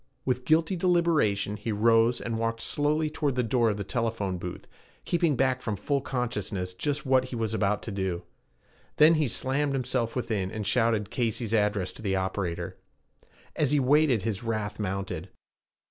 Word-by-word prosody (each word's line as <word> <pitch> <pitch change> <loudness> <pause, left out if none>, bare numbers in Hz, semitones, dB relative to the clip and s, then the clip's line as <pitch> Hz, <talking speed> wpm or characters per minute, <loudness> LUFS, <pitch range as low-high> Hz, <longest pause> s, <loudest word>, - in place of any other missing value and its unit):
With 125 -1 -1
guilty 160 +4 +3
deliberation 165 - +2
he 105 +2 -4
rose 115 +2 +3
and 115 -1 -3
walked 115 0 -1
slowly 150 +4 +1
toward 150 -3 -1
the 125 - +1
door 115 0 +2
of 105 - -1
the 100 - -3
telephone 110 -5 -2
booth, 90 0 -7 0.4
keeping 170 -4 +2
back 130 0 +1
from 110 -4 -2
full 140 +7 -1
consciousness 105 -8 -3
just 145 +9 -2
what 130 -1 +3
he 130 - -6
was 110 -2 -2
about 105 -1 0
to 115 - -5
do. 95 -3 -2 0.7
Then 155 +2 +7
he 155 -3 +2
slammed 135 +4 0
himself 125 -3 -1
within, 110 -7 -1
and 105 +1 -5
shouted 110 -1 +1
Casey's 115 -2 -1
address 105 -3 +1
to - - -13
the 100 -3 0
operator. 95 -2 -3 0.8
As 150 -1 +1
he 145 - +4
waited, 135 -4 +3
his 110 0 -2
wrath 110 -2 -3
mounted. 95 -3 -3
115 Hz, 170 wpm, -27 LUFS, 105-135 Hz, 0.8 s, Then